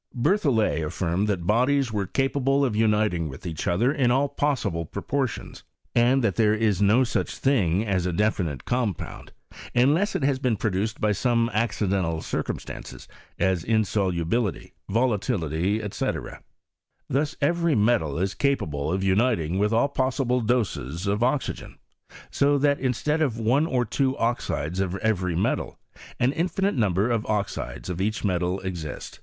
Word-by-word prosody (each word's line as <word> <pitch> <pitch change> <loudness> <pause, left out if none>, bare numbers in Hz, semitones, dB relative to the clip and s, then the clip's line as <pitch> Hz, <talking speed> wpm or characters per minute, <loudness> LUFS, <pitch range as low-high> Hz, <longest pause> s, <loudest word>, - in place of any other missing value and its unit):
Berthollet 120 - +2
affirmed 85 +5 -1
that 95 -5 -1
bodies 125 +5 +2
were 100 -2 -1
capable 135 +4 +1
of 120 -5 -1
uniting 105 -7 +1
with 65 +6 -10
each 80 -3 -4
other 110 +10 +2
in 135 -5 +2
all 135 +3 +3
possible 135 - -1
proportions, 130 - -4 0.3
and 125 +2 +3
that 105 -5 0
there 110 -2 +4
is 105 -4 +1
no 105 +6 +5
such 125 - -2
thing 105 -8 +2
as 95 -4 0
a - - 0
definite 90 - -1
com 120 -6 0
pound, - - -9 0.4
unless 150 +12 +3
it - - -1
has 135 -1 +1
been 125 -5 0
produced 105 +2 -1
by 105 - +2
some 115 +2 +1
acci 110 -1 0
dental 90 -4 0
circumstances, - - -5 0.3
as 95 -3 +1
insolubility, 100 -2 0 0.2
volatility, 100 - 0
&c. - - -1 1.0
Thus 145 +3 0
every 170 +2 +2
metal 105 -10 +2
is 95 +3 -1
capable 80 - -1
of 95 +1 -1
uniting 95 -4 +1
with 105 +1 +2
all 115 +5 +3
possible 130 -2 0
doses 105 - -1
of 100 +2 0
oxygen. 130 +3 -1 0.5
So 145 +1 +3
that 145 0 +2
instead 150 +4 0
of 130 -7 +1
one 125 +8 +2
or 125 -5 +1
two 135 +4 0
oxides 95 - -1
of 95 -1 -1
every 95 -4 0
metal, 90 - -1 0.4
an 125 +2 +3
infinite 190 +4 0
number 105 - +1
of 115 -2 0
oxides 100 - -3
of 90 0 -3
each 110 +2 -1
metal 90 -1 0
exist. 85 -5 -6
110 Hz, 150 wpm, -25 LUFS, 95-130 Hz, 1.0 s, no